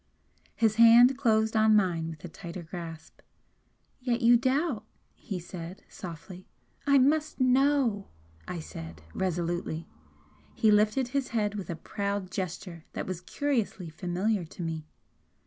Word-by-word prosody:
His 220 Hz, -1 st, +2 dB
hand 235 Hz, +3 st, +8 dB
closed 220 Hz, -4 st, +2 dB
on 220 Hz, 0 st, +5 dB
mine 175 Hz, -5 st, +1 dB
with 160 Hz, +1 st, -9 dB
a -, -, -4 dB
tighter 170 Hz, +1 st, -8 dB
grasp. 165 Hz, -1 st, -9 dB, 0.8 s
"Yet 245 Hz, -1 st, -1 dB
you 240 Hz, 0 st, +7 dB
doubt!" 260 Hz, 0 st, +1 dB, 0.3 s
he 195 Hz, -, -6 dB
said, 175 Hz, +1 st, -8 dB
softly. 180 Hz, +1 st, -9 dB, 0.4 s
"I 280 Hz, 0 st, +6 dB
must 300 Hz, +4 st, +2 dB
KNOW!" 255 Hz, -5 st, +3 dB, 0.4 s
I 175 Hz, -, -4 dB
said, 80 Hz, -, -9 dB
resolutely. 175 Hz, -2 st, -2 dB, 0.7 s
He 220 Hz, -, +4 dB
lifted 215 Hz, +5 st, +3 dB
his 275 Hz, 0 st, -1 dB
head 210 Hz, -4 st, 0 dB
with 200 Hz, -5 st, -6 dB
a 170 Hz, -, -2 dB
proud 200 Hz, +2 st, -3 dB
gesture 180 Hz, -3 st, -5 dB
that -, -, -3 dB
was 185 Hz, -2 st, -4 dB
curiously 220 Hz, -, -2 dB
familiar 180 Hz, +5 st, -1 dB
to 170 Hz, +2 st, -8 dB
me. 160 Hz, -2 st, -4 dB
200 Hz, 135 wpm, -29 LUFS, 170-235 Hz, 0.8 s, hand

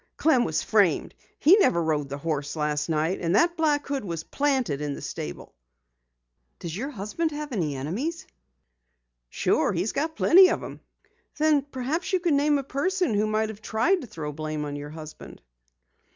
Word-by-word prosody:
"Clem 265 Hz, -6 st, +3 dB
was -, -, -1 dB
framed. -, -, +2 dB, 0.2 s
He 345 Hz, +7 st, +6 dB
never 290 Hz, -, +3 dB
rode 150 Hz, -3 st, -1 dB
the 140 Hz, -, -4 dB
horse 145 Hz, -1 st, -3 dB
last 150 Hz, 0 st, -1 dB
night, 160 Hz, +3 st, 0 dB
and 170 Hz, +2 st, +1 dB
that 340 Hz, +10 st, +3 dB
black 300 Hz, -3 st, +1 dB
hood 280 Hz, -3 st, -3 dB
was 170 Hz, -4 st, -4 dB
planted 260 Hz, -, 0 dB
in 145 Hz, -1 st, -3 dB
the -, -, -8 dB
stable." 70 Hz, -1 st, -6 dB, 1.0 s
"Does 165 Hz, -1 st, -6 dB
your 260 Hz, +8 st, -3 dB
husband 255 Hz, -, -2 dB
have 300 Hz, -1 st, -6 dB
any 165 Hz, -, -1 dB
enemies?" 225 Hz, -, -3 dB, 1.0 s
"Sure, -, -, +1 dB
he's 185 Hz, +3 st, -1 dB
got 315 Hz, +3 st, -2 dB
plenty 370 Hz, +4 st, +7 dB
of -, -, -1 dB
'em." -, -, -8 dB, 0.6 s
"Then 305 Hz, -1 st, +3 dB
perhaps 275 Hz, +4 st, -3 dB
you 370 Hz, -, +3 dB
can 340 Hz, -4 st, +1 dB
name 290 Hz, +1 st, +3 dB
a 275 Hz, -, -3 dB
person 360 Hz, -, 0 dB
who 210 Hz, +1 st, +1 dB
might 215 Hz, 0 st, 0 dB
have 215 Hz, -1 st, -9 dB
tried 280 Hz, -, +1 dB
to 255 Hz, -, -8 dB
throw 150 Hz, -7 st, -6 dB
blame 155 Hz, 0 st, -4 dB
on 145 Hz, 0 st, -5 dB
your 145 Hz, 0 st, -6 dB
husband." 155 Hz, 0 st, -10 dB
220 Hz, 180 wpm, -26 LUFS, -, 1.0 s, plenty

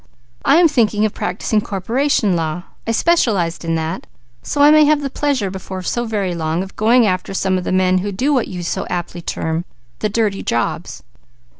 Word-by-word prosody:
I 275 Hz, -, +4 dB
am 340 Hz, +1 st, +6 dB
thinking 220 Hz, -7 st, +2 dB
of 215 Hz, -, -1 dB
practising 210 Hz, +3 st, -1 dB
corporation 215 Hz, +1 st, 0 dB
law; 165 Hz, +1 st, -2 dB, 0.2 s
I -, -, +1 dB
specialized 220 Hz, -, +1 dB
in 165 Hz, 0 st, -1 dB
that, 160 Hz, +3 st, -3 dB, 0.3 s
so 290 Hz, -, -4 dB
I 295 Hz, -, +8 dB
may 305 Hz, 0 st, +7 dB
have 300 Hz, 0 st, +3 dB
the 275 Hz, -, -3 dB
pleasure 260 Hz, -11 st, -1 dB
before 190 Hz, 0 st, -6 dB
so 240 Hz, +5 st, -1 dB
very 205 Hz, -5 st, -2 dB
long 165 Hz, +1 st, -1 dB
of 190 Hz, -, -11 dB
going 230 Hz, +2 st, +4 dB
after 185 Hz, 0 st, -1 dB
some 190 Hz, 0 st, +1 dB
of 180 Hz, -1 st, -2 dB
the -, -, -2 dB
men 185 Hz, 0 st, +3 dB
who 200 Hz, +2 st, -3 dB
do 260 Hz, +10 st, 0 dB
what 255 Hz, -4 st, +1 dB
you 180 Hz, -2 st, -6 dB
so 170 Hz, -, -3 dB
aptly 175 Hz, 0 st, -4 dB
term 160 Hz, 0 st, -2 dB, 0.4 s
the 215 Hz, -, 0 dB
'dirty' 210 Hz, -2 st, 0 dB
jobs." 120 Hz, -, -2 dB
195 Hz, 195 wpm, -18 LUFS, 180-240 Hz, 0.4 s, I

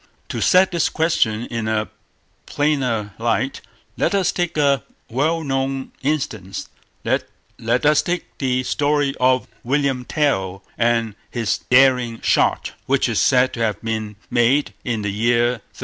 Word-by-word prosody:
To -, -, -3 dB
set 185 Hz, 0 st, +5 dB
this 170 Hz, -2 st, +1 dB
question 120 Hz, -9 st, +1 dB
in 115 Hz, -2 st, -2 dB
a 110 Hz, -1 st, 0 dB, 0.6 s
plainer 125 Hz, -9 st, 0 dB
light, 120 Hz, +3 st, -1 dB, 0.3 s
let -, -, +1 dB
us 195 Hz, -2 st, +2 dB
take 175 Hz, -3 st, -2 dB
a 140 Hz, -3 st, +3 dB, 0.3 s
well 160 Hz, +7 st, 0 dB
known 135 Hz, -1 st, -2 dB
instance; 115 Hz, -10 st, -3 dB, 0.3 s
let 120 Hz, +5 st, -2 dB
us 150 Hz, 0 st, +5 dB
take 180 Hz, 0 st, -2 dB, 0.2 s
the 130 Hz, -2 st, 0 dB
story 145 Hz, +1 st, +1 dB
of 130 Hz, 0 st, +2 dB, 0.2 s
William 135 Hz, 0 st, 0 dB
Tell 95 Hz, -12 st, -1 dB
and 115 Hz, -2 st, +1 dB, 0.2 s
his 115 Hz, -5 st, -1 dB
daring 125 Hz, -3 st, +4 dB
shot, -, -, +2 dB, 0.2 s
which -, -, +2 dB
is -, -, +1 dB
said 130 Hz, 0 st, +3 dB
to -, -, -6 dB
have 110 Hz, -2 st, 0 dB
been 110 Hz, -2 st, -3 dB, 0.2 s
made 125 Hz, +5 st, +2 dB
in 115 Hz, -4 st, -2 dB
the 100 Hz, -, -1 dB
year 120 Hz, +3 st, +2 dB
1307. 120 Hz, -3 st, -7 dB
125 Hz, 145 wpm, -21 LUFS, 115-145 Hz, 0.6 s, set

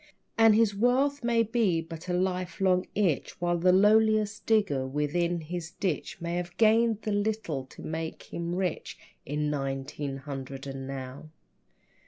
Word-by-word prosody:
And 225 Hz, -1 st, +6 dB
his 220 Hz, -2 st, +3 dB
wealth 255 Hz, +6 st, +2 dB
may 235 Hz, -1 st, +3 dB
be 220 Hz, -6 st, +1 dB
but 165 Hz, +1 st, -8 dB
a -, -, 0 dB
lifelong 185 Hz, 0 st, 0 dB
itch, 185 Hz, -9 st, 0 dB
While 175 Hz, 0 st, 0 dB
the 180 Hz, +2 st, +4 dB
lowliest 215 Hz, +1 st, +3 dB
digger 190 Hz, -13 st, +2 dB
within 165 Hz, +5 st, 0 dB
his 165 Hz, +1 st, -5 dB
ditch 175 Hz, -4 st, -3 dB
May 170 Hz, 0 st, -3 dB
have 175 Hz, 0 st, -5 dB
gained 225 Hz, 0 st, +3 dB
the 215 Hz, -, -2 dB
little 205 Hz, -9 st, -1 dB
to -, -, -13 dB
make 160 Hz, 0 st, -4 dB
him 170 Hz, +1 st, -3 dB
rich 180 Hz, -3 st, -3 dB, 0.3 s
In 150 Hz, +1 st, -1 dB
nineteen 135 Hz, 0 st, -3 dB
hundred 135 Hz, -1 st, -7 dB
and 135 Hz, -1 st, -6 dB
now. 135 Hz, +2 st, -7 dB
175 Hz, 150 wpm, -28 LUFS, 150-210 Hz, 0.3 s, And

